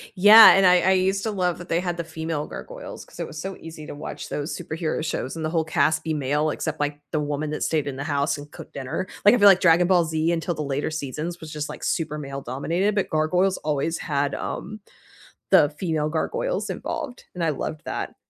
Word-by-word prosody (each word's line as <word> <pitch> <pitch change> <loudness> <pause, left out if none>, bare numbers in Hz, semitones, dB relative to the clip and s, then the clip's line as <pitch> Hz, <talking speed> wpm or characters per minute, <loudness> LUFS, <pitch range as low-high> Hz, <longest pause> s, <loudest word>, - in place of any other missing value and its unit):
Yeah, 210 +4 +10
and 195 0 +5
I 180 0 +6
I 190 - +2
used 190 +1 +1
to 220 - -1
love 180 -4 0
that 175 - -11
they 165 - +2
had 175 -1 -3
the 170 - -4
female 160 -2 -4
gargoyles, - - -9
'cause - - -16
it - - -3
was 155 - -8
so 190 +3 -5
easy 160 -2 -10
to - - -7
watch 145 -1 -7
those 145 +3 -4
superhero 160 -2 -3
shows 155 -2 -3
and 160 - -4
the 155 - 0
whole 165 -1 +1
cast 155 0 +1
be 160 - -1
male 150 +1 0
except, 160 0 -4
like, 145 0 -2
the 155 - +1
woman 150 +1 -2
that 150 - -4
stayed 155 -3 0
in 135 -2 -4
the 135 - -4
house 145 -1 0
and 145 0 -10
cooked - - -12
dinner, 140 +7 -4 0.2
like, 205 - +7
I - - +2
feel 205 -1 +8
like 190 -1 +6
Dragon 170 0 +5
Ball 180 -2 +4
Z, 160 +1 0
until 170 +1 -1
the 155 - -4
later 140 +2 -2
seasons, 155 +3 -5
was 160 - -9
just, 150 0 -4
like, - - -9
super 150 -2 -1
male-dominated, 140 - -2
but 200 - 0
Gargoyles 180 +5 +1
always 155 +2 -1
had, 145 -3 -1
um, 215 0 -5 0.7
the 145 - +6
female 155 -4 -1
gargoyles - - -2
involved, 260 -5 -5
and 175 - -3
I 165 - +2
loved 155 +1 -4
that. - - -4
160 Hz, 230 wpm, -24 LUFS, 150-180 Hz, 0.7 s, Yeah